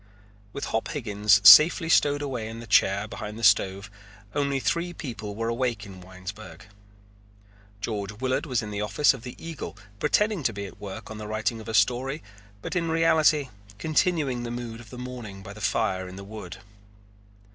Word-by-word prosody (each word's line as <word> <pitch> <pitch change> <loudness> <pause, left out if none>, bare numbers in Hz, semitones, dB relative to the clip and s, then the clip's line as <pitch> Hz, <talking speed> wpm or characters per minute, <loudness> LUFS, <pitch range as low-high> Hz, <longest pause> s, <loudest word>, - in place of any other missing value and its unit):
With 140 - -5
Hop 110 - -2
Higgins 105 -6 +3
safely 165 +1 +9
stowed 145 -2 +3
away 125 -6 -3
in 115 +1 -7
the 115 - -8
chair 100 -1 +3
behind 105 0 -7
the 115 - -8
stove 100 -1 +3 0.4
only 140 -1 0
three 170 +5 -1
people 110 -10 -6
were 115 +1 -2
awake 115 -3 -1
in 95 -2 -11
Winesburg. 95 +4 -10 1.2
George 105 -1 -3
Willard 130 +7 -2
was 125 -5 0
in 105 - -6
the 105 0 -3
office 135 +8 +3
of 135 - -9
the 125 +1 -8
Eagle 150 - -7 0.2
pretending 210 - +1
to 120 -4 0
be 100 0 -5
at 100 - -12
work 100 +1 -8
on 110 - -7
the 105 - -6
writing 110 +2 -2
of 110 - -12
a 110 - -2
story 135 +6 +1 0.4
but - - -4
in 170 -2 0
reality 160 -3 +3 0.3
continuing 150 - +1
the 120 - -5
mood 120 -1 -6
of 120 - -13
the 125 - -10
morning 120 -6 -8
by 100 - -9
the 110 - -12
fire 95 -2 0
in 90 - -9
the 100 - -8
wood. 100 -3 -8
115 Hz, 185 wpm, -26 LUFS, 105-135 Hz, 1.2 s, safely